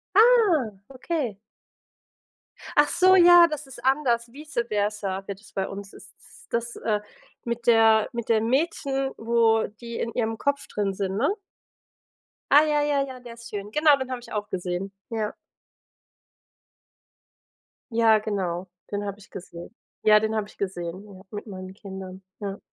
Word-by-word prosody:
Ah, 420 Hz, -, +5 dB, 0.2 s
okay. 265 Hz, -, -3 dB, 1.4 s
Ach 295 Hz, 0 st, +6 dB
so, 370 Hz, +1 st, +5 dB
ja, 350 Hz, -1 st, +8 dB
das 300 Hz, -3 st, -6 dB
ist 265 Hz, -, -11 dB
anders, 245 Hz, -4 st, +1 dB
Vice-Versa 210 Hz, -, -2 dB
wird 200 Hz, -1 st, -6 dB
das 215 Hz, -, -19 dB
bei 195 Hz, -, -1 dB
uns 200 Hz, 0 st, -8 dB
ist -, -, -15 dB
s -, -, -18 dB
das, 235 Hz, 0 st, -2 dB
äh 215 Hz, -2 st, -1 dB, 0.5 s
mit 235 Hz, 0 st, -3 dB
der 225 Hz, -2 st, +5 dB
mit 235 Hz, -2 st, -5 dB
dem 225 Hz, 0 st, +2 dB
Mädchen, 270 Hz, -1 st, 0 dB
wo 225 Hz, -1 st, +3 dB, 0.2 s
die 235 Hz, -1 st, -6 dB
in 230 Hz, -, -2 dB
ihrem 225 Hz, -2 st, -1 dB
Kopf 280 Hz, +3 st, -1 dB
drin 200 Hz, -2 st, -2 dB
sind, 190 Hz, 0 st, -3 dB
ne? 245 Hz, +8 st, +2 dB, 1.2 s
Ah 290 Hz, +2 st, +8 dB
ja, 300 Hz, -1 st, +2 dB
ja, 290 Hz, -1 st, +1 dB
ja, 260 Hz, -1 st, -9 dB
der 240 Hz, -1 st, -10 dB
ist 235 Hz, +1 st, -12 dB
schön. 205 Hz, -1 st, -6 dB
Genau, 300 Hz, +2 st, +5 dB
den 260 Hz, -1 st, -5 dB
habe 250 Hz, -1 st, -4 dB
ich -, -, -14 dB
auch 210 Hz, -1 st, -3 dB
gesehen. 180 Hz, +1 st, -3 dB, 0.2 s
Ja. 220 Hz, -2 st, -2 dB, 2.6 s
Ja, 225 Hz, -1 st, +5 dB
genau, 190 Hz, -4 st, -3 dB, 0.2 s
den 205 Hz, 0 st, -2 dB
habe 200 Hz, -1 st, -5 dB
ich 205 Hz, -, -17 dB
gesehen. 175 Hz, +3 st, -10 dB, 0.3 s
Ja, 215 Hz, 0 st, +7 dB
den 220 Hz, +1 st, -1 dB
habe 215 Hz, -2 st, -1 dB
ich -, -, -18 dB
gesehen, 185 Hz, -1 st, -4 dB
ja 195 Hz, -3 st, -13 dB
mit 205 Hz, +2 st, -7 dB
meinen 185 Hz, -2 st, -8 dB
Kindern. 190 Hz, -1 st, -9 dB, 0.2 s
Ja. 200 Hz, -1 st, -5 dB
225 Hz, 160 wpm, -25 LUFS, 200-265 Hz, 2.6 s, ja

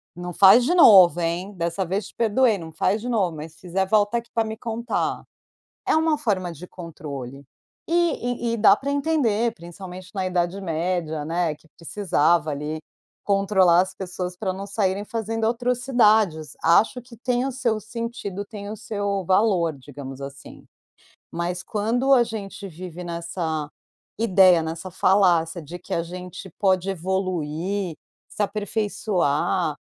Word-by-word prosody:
Não 175 Hz, 0 st, -6 dB
faz 195 Hz, +7 st, +7 dB
de 285 Hz, -, +1 dB
novo, 190 Hz, -, +8 dB
hein. 170 Hz, +3 st, -2 dB
Dessa 170 Hz, +2 st, -1 dB
vez 190 Hz, +3 st, -2 dB
te -, -, -17 dB
perdoei, 230 Hz, 0 st, +3 dB
não 165 Hz, -3 st, -9 dB
faz 195 Hz, +6 st, 0 dB
de 245 Hz, -, -4 dB
novo, 195 Hz, -8 st, 0 dB
mas 155 Hz, +1 st, -8 dB
se 160 Hz, -, -22 dB
fizer, 185 Hz, +1 st, -1 dB
volta 205 Hz, +3 st, +2 dB
aqui 235 Hz, 0 st, -14 dB
para 225 Hz, -2 st, +1 dB
me 220 Hz, -, -4 dB
contar". 235 Hz, +1 st, -2 dB, 0.6 s
É -, -, +3 dB
uma 315 Hz, -1 st, +2 dB
forma 195 Hz, -10 st, -1 dB
de 170 Hz, +2 st, -10 dB
controle, 140 Hz, -7 st, -8 dB, 0.4 s
e 320 Hz, -9 st, 0 dB
e -, -, 0 dB
e -, -, -1 dB
dá 210 Hz, -2 st, +6 dB
para 280 Hz, +5 st, -4 dB
entender, 270 Hz, -7 st, +1 dB
principalmente 180 Hz, -1 st, -10 dB
na 190 Hz, -2 st, -2 dB
Idade 180 Hz, +1 st, -1 dB
Média, 165 Hz, -3 st, -2 dB
né, 165 Hz, 0 st, -1 dB
que 160 Hz, -, -25 dB
precisava 170 Hz, -3 st, +1 dB
ali 150 Hz, +2 st, -4 dB, 0.4 s
controlar 195 Hz, -3 st, +4 dB
as 185 Hz, 0 st, -4 dB
pessoas 180 Hz, -1 st, -5 dB
para 190 Hz, -1 st, -2 dB
não 195 Hz, +1 st, -6 dB
saírem 200 Hz, -1 st, -1 dB
fazendo 225 Hz, 0 st, -2 dB
atrocidades. 230 Hz, -, +2 dB
Acho 210 Hz, +9 st, +4 dB
que 245 Hz, 0 st, -15 dB
tem 245 Hz, +2 st, 0 dB
o 270 Hz, -, -2 dB
seu 240 Hz, -4 st, -1 dB
sentido, 220 Hz, -3 st, -5 dB
tem 200 Hz, -1 st, -8 dB
o 215 Hz, -, -5 dB
seu 205 Hz, -2 st, -2 dB
valor, 185 Hz, -3 st, +2 dB
digamos 135 Hz, 0 st, -9 dB
assim. 140 Hz, 0 st, -10 dB, 0.7 s
Mas 175 Hz, +1 st, -3 dB
quando 235 Hz, +6 st, 0 dB
a 245 Hz, -, +5 dB
gente 200 Hz, -3 st, -7 dB
vive 180 Hz, 0 st, -8 dB
nessa 170 Hz, -3 st, -3 dB, 0.5 s
ideia, 185 Hz, -6 st, +5 dB
nessa 165 Hz, +3 st, -5 dB
falácia 175 Hz, -3 st, +2 dB
de 170 Hz, +4 st, -8 dB
que 180 Hz, -, -5 dB
a 170 Hz, -, 0 dB
gente 180 Hz, +2 st, -8 dB
pode 190 Hz, -1 st, +2 dB
evoluir, 185 Hz, 0 st, -2 dB, 0.3 s
se 210 Hz, -, -3 dB
aperfeiçoar. 200 Hz, -6 st, 0 dB
190 Hz, 155 wpm, -23 LUFS, 170-220 Hz, 0.7 s, novo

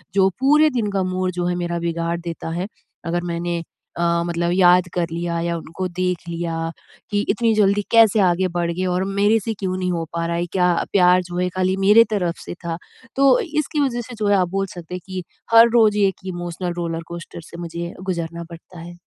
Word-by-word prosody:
जो 190 Hz, -1 st, +5 dB
पूरे 300 Hz, +4 st, +5 dB
दिन 235 Hz, -7 st, -1 dB
का 195 Hz, -1 st, 0 dB
मूड 185 Hz, 0 st, -1 dB
जो -, -, 0 dB
है 180 Hz, -, 0 dB
मेरा 175 Hz, -1 st, -2 dB
बिगाड़ 170 Hz, 0 st, -2 dB
देता 170 Hz, -1 st, -6 dB
है। 190 Hz, -, -3 dB, 0.4 s
अगर 175 Hz, +1 st, -1 dB
मैंने 170 Hz, 0 st, -2 dB, 0.4 s
अ, 170 Hz, 0 st, +1 dB
मतलब 170 Hz, 0 st, -1 dB
याद 180 Hz, -1 st, +5 dB
कर 175 Hz, -1 st, 0 dB
लिया 170 Hz, 0 st, -2 dB
या 170 Hz, 0 st, -1 dB
उनको 165 Hz, +3 st, -5 dB
देख 180 Hz, 0 st, 0 dB
लिया 165 Hz, -1 st, -3 dB, 0.4 s
कि 205 Hz, 0 st, +1 dB
इतनी 225 Hz, +2 st, +2 dB
जल्दी 205 Hz, -1 st, +3 dB
कैसे 225 Hz, -2 st, +6 dB
आगे 180 Hz, +1 st, +1 dB
बढ़ 170 Hz, -1 st, 0 dB
गए 185 Hz, +2 st, -2 dB
और 180 Hz, +1 st, 0 dB
मेरे 200 Hz, +3 st, +2 dB
से 225 Hz, -, -1 dB
क्यों 185 Hz, -2 st, -2 dB
नहीं 180 Hz, -1 st, -1 dB
हो 165 Hz, -2 st, -2 dB
पा 170 Hz, 0 st, -1 dB
रहा 170 Hz, 0 st, -1 dB
है 170 Hz, +1 st, -1 dB
क्या 180 Hz, -2 st, +3 dB, 0.2 s
प्यार 180 Hz, -1 st, +5 dB
जो 175 Hz, 0 st, -7 dB
है 180 Hz, 0 st, +1 dB
खाली 185 Hz, 0 st, +1 dB
मेरे 205 Hz, +4 st, +6 dB
तरफ़ 180 Hz, -5 st, -1 dB
से -, -, -5 dB
था? 165 Hz, -1 st, -2 dB, 0.4 s
तो 275 Hz, -, +5 dB
इसकी 310 Hz, -, -2 dB
वज़ह 245 Hz, -4 st, 0 dB
से 245 Hz, +1 st, -9 dB
जो 210 Hz, -, 0 dB
है 205 Hz, -, +4 dB
आप 180 Hz, -2 st, +1 dB
बोल 195 Hz, +1 st, -1 dB
सकते 175 Hz, 0 st, -7 dB
हैं 180 Hz, -, -6 dB
कि 185 Hz, -1 st, -5 dB, 0.3 s
हर 230 Hz, +1 st, +8 dB
रोज़ 220 Hz, -3 st, +4 dB
एक 190 Hz, -1 st, -5 dB
इमोशनल 175 Hz, 0 st, -4 dB
रोलर-कोस्टर 170 Hz, 0 st, -5 dB
से -, -, -9 dB
मुझे 170 Hz, -1 st, -6 dB
ये 170 Hz, 0 st, -4 dB
गुज़रना 170 Hz, -2 st, -3 dB
पड़ता 170 Hz, +1 st, -12 dB
है। 175 Hz, +1 st, -10 dB
180 Hz, 215 wpm, -21 LUFS, 170-200 Hz, 0.4 s, हर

